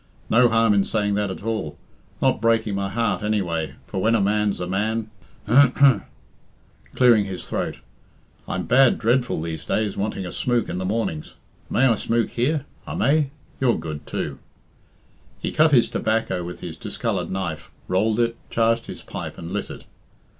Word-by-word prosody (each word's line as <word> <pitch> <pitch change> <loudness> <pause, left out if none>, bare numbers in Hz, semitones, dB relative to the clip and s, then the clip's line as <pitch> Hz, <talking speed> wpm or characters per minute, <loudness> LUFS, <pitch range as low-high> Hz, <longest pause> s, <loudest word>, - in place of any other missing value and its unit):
No 120 +2 +6
harm 115 -1 +4
in 100 -1 +3
saying 105 0 0
that 105 0 0
at 95 - -7
all. 110 -9 -3 0.5
Not - - +2
breaking 115 -2 +2
my 100 0 -1
heart, 115 +3 0
anyway, 90 -7 -1
for 95 - -4
when 115 +3 +3
a - - +3
man's 105 0 +1
a 90 - -2
man 105 +4 -1 0.4
H'm!" 135 -2 +5 0.9
clearing 120 -5 +5
his 95 -2 -6
throat, - - -2 0.7
"I'm - - -3
bad 130 -1 +5
dreadful 120 -1 +1
these 80 0 -5
days 105 -2 -1
wanting 100 -1 -3
a 90 - -5
smook 120 -2 0
in 90 - -3
the 95 - -3
mornings. 95 -7 -2 0.3
May 130 - +3
I 125 - +5
smook 115 +2 0
here? 145 +4 0 0.2
I - - -4
may? 150 -1 +2 0.3
You're 125 -3 +2
good, 80 -2 -6
too." 70 -2 -4 1.0
He - - -3
cut 155 0 +4
his 125 -5 +5
tobacco 110 -5 -1
with 90 +1 -7
his 80 -2 -7
discoloured - - -3
knife, 95 -5 -4 0.2
rolled 105 +4 +1
it, 115 -1 +1
charged 115 0 +1
his - - -8
pipe, - - -7
and 85 +1 -7
lit 105 +1 -3
it. - - -9
110 Hz, 170 wpm, -23 LUFS, 95-115 Hz, 1.0 s, No